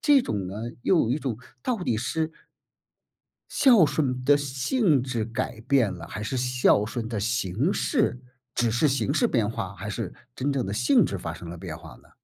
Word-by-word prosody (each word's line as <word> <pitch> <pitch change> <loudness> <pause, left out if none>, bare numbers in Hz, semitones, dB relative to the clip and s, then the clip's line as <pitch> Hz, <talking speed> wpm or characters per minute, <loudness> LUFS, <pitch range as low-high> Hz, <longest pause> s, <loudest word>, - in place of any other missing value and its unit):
这 285 -4 +5
种 100 -3 -3
呢， 95 - -6 0.3
又 185 - +3
有 115 - 0
一 140 - +1
种， 130 -7 -3 0.3
到 250 - 0
底 115 -11 0
是 160 +6 -2 1.2
孝 235 - +6
顺 135 -4 -1
的 145 +1 +6
性 145 - +1
质 120 -3 -2
改 115 0 -4
变 120 -6 +2
了？ 85 - -8
还 105 - -6
是 110 +5 -3
孝 125 -4 +3
顺 115 0 -4
的 115 -2 -4
形 115 - 0
式 220 - +1 0.3
只 120 -1 +1
是 120 +7 +2
形 120 -6 0
式 - - +3
变 - - +1
化？ - - -4
还 - - -6
是 - - -4 0.2
真 140 +2 -1
正 135 -2 -1
的 100 - -3
性 250 - +4
质 100 - -3
发 85 -2 -5
生 85 -1 -9
了 85 - -7
变 - - -7
化 - - -12
呢？ - - -23
125 Hz, 215 characters per minute, -26 LUFS, 110-145 Hz, 1.2 s, 孝